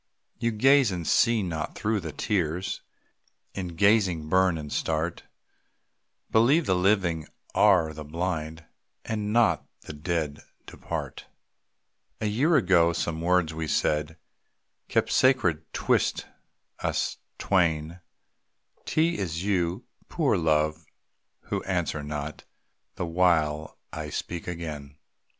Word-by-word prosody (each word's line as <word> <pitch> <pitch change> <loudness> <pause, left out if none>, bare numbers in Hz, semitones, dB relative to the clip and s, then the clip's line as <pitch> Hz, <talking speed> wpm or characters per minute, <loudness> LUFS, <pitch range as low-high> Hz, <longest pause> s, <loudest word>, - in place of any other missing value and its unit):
You 115 - +1
gaze 135 +3 +4
and 90 -3 -4
see 115 -3 +3
not, 80 -4 -4
though 110 0 0
the 80 -4 -6
tears 90 0 -2 0.7
In 90 -3 -5
gazing 95 -5 +3
burn 95 -1 +3
and 75 -2 -6
start. 80 +2 -1 1.1
Believe, 135 +9 +4
the 95 - +2
living 90 -4 +1 0.3
are 90 -7 +4
the 75 0 -7
blind, 80 0 -4 0.4
Not 110 +1 +1 0.2
that - - -22
the - - -7
dead 75 -1 -3 0.2
depart. - - -6 0.9
A - - -2
year 130 +11 +2
ago 85 - +4
some 80 -1 -2
words 85 -2 +2
we 80 0 -4
said 75 +1 0 0.7
Kept - - +1
sacred 90 - +2
'twixt - - +1 0.5
us - - -1 0.2
twain, 85 -3 +1 0.9
'T 165 +2 +1
is 85 -2 -3
you, 90 -3 0 0.2
poor - - +1
Love, 75 0 +1 0.6
who - - -3
answer 75 - -1
not, 75 0 -5 0.5
The - - -3
while 80 -3 +1 0.2
I 75 -1 -5
speak 85 +3 -5
again. 75 -5 -6
85 Hz, 115 wpm, -27 LUFS, 80-100 Hz, 1.1 s, gaze